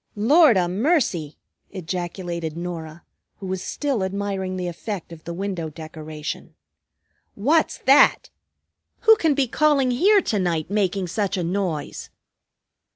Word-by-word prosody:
"Lord 260 - +5
'a' 180 -1 +2
mercy!" 195 - 0 0.3
ejaculated 175 -2 -5
Norah, 170 -2 -6 0.3
who 195 - -9
was 190 -1 -3
still 275 -5 -2
admiring 190 -1 -3
the 180 -1 -3
effect 175 0 -6
of 160 - -13
the 170 - -5
window 180 -3 -4
decoration. 155 -1 -8 0.8
"What's 300 +10 +2
that? 275 +2 +5 0.7
Who 445 - +7
can 320 -8 +2
be 270 -2 +1
calling 280 -1 +2
here 395 - +4
to 210 - -1
night, 170 -2 -1
making 195 -2 0
such 200 +2 -2
a 180 - -1
noise?" 175 -3 -3
190 Hz, 130 wpm, -23 LUFS, 170-235 Hz, 0.8 s, Who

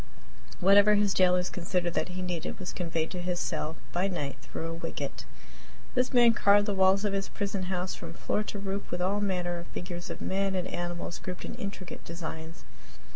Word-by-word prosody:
Whatever 200 +3 +7
his 205 -1 +3
jailers 180 -1 +4
considered 175 -1 -1
that - - +1
he 185 +1 -4
needed 175 -2 -3
was 185 -2 -5
conveyed 165 -2 -1
to 180 - -4
his 175 0 -1
cell 160 -2 -2 0.2
by 180 +3 +1
night 145 -8 -2
through 160 - -6
a 165 - -3
wicket. 165 - -4 0.7
This 250 -1 +2
man 240 -2 +7
carved 205 -1 +5
the 205 - 0
walls 190 +1 +4
of 205 - +1
his 195 0 -1
prison 200 -2 -2
house 180 0 -1
from 165 -1 -7
floor 210 - 0
to 210 - -4
roof 200 0 -3
with 175 - -2
all 195 +3 +1
manner 180 -3 0
of 170 - -9
figures 175 -1 -6
of - - -5
men 195 0 0
and 185 -1 0
animals 175 0 -4
grouped 180 -1 -5
in - - -5
intricate 195 -2 -6
designs. 165 -1 -7
180 Hz, 195 wpm, -30 LUFS, 175-195 Hz, 0.7 s, Whatever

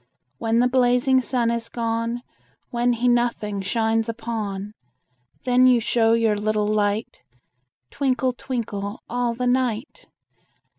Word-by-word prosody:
When 225 0 +1
the 245 +1 +4
blazing 250 +1 +3
sun 245 -2 0
is 235 -1 -3
gone, 230 +1 -2 0.5
When 240 0 +1
he 240 +1 0
nothing 240 -4 +1
shines 225 +2 0
upon, 215 -3 -4 0.7
Then 250 0 +4
you 250 -2 +5
show 225 0 +2
your 225 -2 +2
little 210 0 0
light, 210 0 -1 0.7
Twinkle, 260 -2 0
twinkle, 215 -5 -5
all 240 0 -1
the 250 +1 -2
night. 250 0 -1
235 Hz, 120 wpm, -23 LUFS, 220-245 Hz, 0.7 s, you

